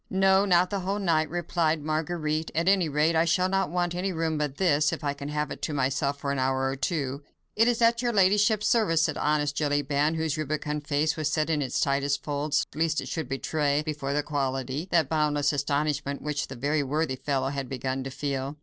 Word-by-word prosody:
"No! 190 +1 +4
not 180 -1 +3
the 200 - -1
whole 195 +2 -2
night," 165 -6 +1
replied 165 -2 0
Marguerite. 155 0 -2
"At 165 +2 0
any 190 -4 +3
rate, 150 +3 +2
I 160 +1 +3
shall 180 +2 +2
not 195 -2 0
want 175 0 -1
any 185 +2 -2
room 160 -2 -1
but 150 -2 -2
this, 150 -5 +3
if - - -5
I 145 -1 0
can 140 0 -7
have 150 0 -2
it - - -7
to 155 - -3
myself 140 +1 0
for 140 0 -2
an 140 - -1
hour 130 0 +1
or 135 - -2
two." 140 -1 -2 0.3
"It 225 +2 +4
is 240 -1 +2
at 230 +1 +4
your 240 -1 +1
ladyship's 210 +1 +3
service," 165 -9 +3
said 155 -2 0
honest 145 -1 0
Jellyband, 145 +1 +1
whose 160 -1 -1
rubicund 150 0 -3
face 150 +1 +1
was 155 -2 -1
set 155 +1 0
in 150 -2 +1
its 130 - -1
tightest 140 0 0
folds, 145 0 0
lest 160 +1 0
it - - -6
should 160 -6 -4
betray 145 +2 0
before 150 -3 -3
"the 145 0 0
quality" 135 +1 -2
that 165 -5 +3
boundless 150 -1 +1
astonishment 145 0 -1
which 150 -1 -2
the 140 +4 -1
worthy 150 -1 0
fellow 135 -1 -1
had 140 -2 -4
begun 130 0 -3
to 135 - -5
feel. 140 +1 -3
150 Hz, 215 wpm, -27 LUFS, 140-165 Hz, 0.3 s, No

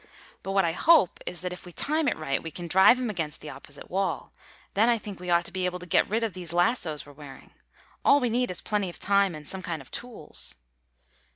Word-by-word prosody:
But 195 - -4
what 195 -2 +4
I 165 - +1
hope 310 - +4
is 175 -2 -4
that 180 0 -3
if 180 - -10
we 180 - -10
time 305 - 0
it - - +1
right 140 -3 -1
we 165 - -5
can 170 +2 -7
drive 190 +8 +7
him 250 -3 -1
against 160 -6 -4
the 150 - -8
opposite 140 +1 -10
wall. 195 +2 -1 0.4
Then 220 +4 +4
I 235 - +4
think 205 -4 -8
we 180 0 -6
ought 170 0 +3
to 195 - -7
be 185 0 -2
able 180 0 -1
to 180 - -10
get 175 - +3
rid 225 +3 0
of 220 -4 -1
these 175 -2 -7
lassos 175 -5 +1
we're 145 - -13
wearing. 140 -2 -12 0.5
All 285 - +6
we 245 -4 0
need 250 +2 +1
is 180 - -3
plenty 205 -3 -1
of 175 - -10
time 200 -3 +2
and 150 -1 -10
some 190 - -6
kind 170 -3 -4
of 135 - -14
tools." 235 -11 -4
180 Hz, 250 wpm, -27 LUFS, 165-210 Hz, 0.5 s, drive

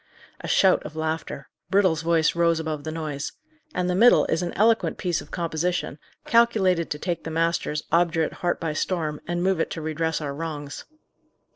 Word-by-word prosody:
'" - - -20
A - - -6
shout 190 -1 +4
of 150 - -9
laughter; 160 -3 -3 0.2
Brittle's 185 -5 +3
voice 165 -1 +2
rose 170 -1 +2
above 155 -2 -4
the 155 - -3
noise. 155 -3 -4 0.4
"And 180 0 0
the 180 - +1
middle 230 +7 +6
is 165 - 0
an 175 - -2
eloquent 225 +2 +2
piece 175 -5 -1
of 145 - -13
composition, 170 -2 -2 0.3
calculated 200 -8 +3
to 150 - -3
take 170 +1 -3
the - - -5
master's 165 -2 0
obdurate 165 -2 +2
heart 175 -1 0
by 160 -3 -2
storm, 155 -2 -2
and 175 0 -1
move 190 -2 +1
it - - 0
to - - -5
redress 160 +1 -1
our 145 -3 -4
wrongs." 145 -2 -6
165 Hz, 185 wpm, -25 LUFS, 155-180 Hz, 0.4 s, middle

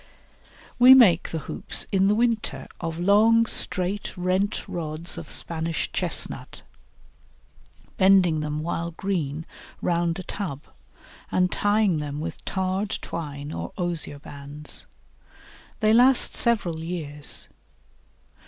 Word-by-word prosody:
We 255 +2 +10
make 190 -10 +5
the 165 - -3
hoops - - -2
in 195 -1 +3
the 205 - +3
winter 220 - -1
of 165 0 -4
long 215 +5 +4
straight 195 -2 0
rent 185 +3 -1
rods 160 0 -5
of - - -8
Spanish 165 0 -2
Chestnut, - - -2 1.3
bending 190 -4 +4
them 150 0 -3
while 170 0 -2
green 160 -4 -3 0.3
round 170 -1 0
a 185 - -6
tub, 165 -8 -5 0.7
and 180 0 +2
tying 205 -5 +2
them 145 -1 -5
with 165 +1 -6
tarred 190 +2 -2
twine 145 -3 -6
or - - -6
osier 175 -5 -2
bands. 145 +1 -7 0.9
They 215 0 +4
last 250 +2 +5
several 205 -9 +2
years. 160 -4 -1
175 Hz, 115 wpm, -25 LUFS, 155-200 Hz, 1.3 s, We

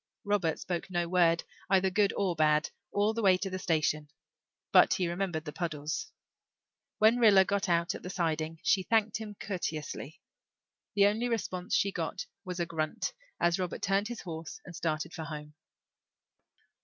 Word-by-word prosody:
Robert 200 -6 +1
spoke 175 0 -4
no 175 -2 0
word, 170 -1 +3 0.3
either 190 -1 +3
good 200 +1 +3
or 190 -4 +1
bad, 155 0 +3 0.2
all 205 +2 +2
the 230 - -2
way 190 -3 +5
to 195 +1 -4
the 185 - -3
station, 155 -4 0 0.6
but - - +6
he 180 - 0
remembered 175 -2 -2
the 150 - -6
puddles. 155 -3 -3 0.9
When 220 +3 +5
Rilla 205 -5 +7
got 200 0 0
out 170 0 +2
at - - -7
the 180 - -6
siding 160 -3 -1
she 195 - +3
thanked 220 +2 +1
him 210 -2 -7
courteously. 160 -4 -4 0.8
The 200 -1 +6
only 220 +4 +2
response 185 -6 -2
she 200 - +2
got 180 +2 -3 0.2
was 180 -2 -5
a 170 - +1
grunt 155 -2 -2 0.3
as 170 +1 +2
Robert 180 -1 -3
turned 200 +1 +2
his 240 -1 -6
horse 165 -2 -7
and 180 - -9
started 160 0 -2
for 160 -2 -5
home. 150 -1 -7
180 Hz, 170 wpm, -30 LUFS, 160-200 Hz, 0.9 s, Rilla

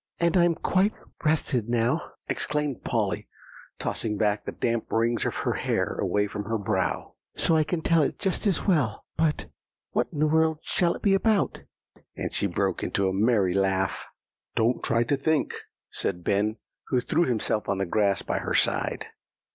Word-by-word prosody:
"And 170 0 +2
I'm 175 -2 +4
quite 190 +6 +1 0.3
rested 145 -7 +1
now," 120 +6 +2 0.3
exclaimed 150 -3 -2
Polly, - - -1 0.5
tossing 105 -2 -2
back 105 0 +1
the - - -3
damp 115 -1 -2
rings 115 +1 +1
of - - -3
hair - - 0
away 105 0 +1
from 105 0 -5
her 115 +1 -1
brow, 95 -4 -1 0.2
"so 165 - +2
I 155 - +4
can 160 +1 -2
tell 165 -2 +4
it 145 - 0
just 195 +2 -1
as 195 - 0
well. 145 - +1
But 155 -2 0 0.4
what - - +1
in 155 - -8
the 150 - +3
world 160 0 +3
shall 175 -2 +1
it - - -10
be 200 - +4
about?" 200 0 +2 0.6
and - - -4
she - - +1
broke - - -1
into 100 - 0
a 95 - 0
merry 100 -2 +3
laugh. 95 0 +1 0.6
"Don't 115 +2 +1
try 115 0 +3
to 135 +4 +1
think," 150 +2 +1 0.4
said 90 - -2
Ben, 105 +4 +1 0.3
who 125 - +2
threw 160 +7 +1
himself 110 -3 -1
on 100 - +1
the 95 - 0
grass 100 +1 +1
by - - -1
her - - -2
side. - - +1
120 Hz, 175 wpm, -26 LUFS, 105-160 Hz, 0.6 s, I'm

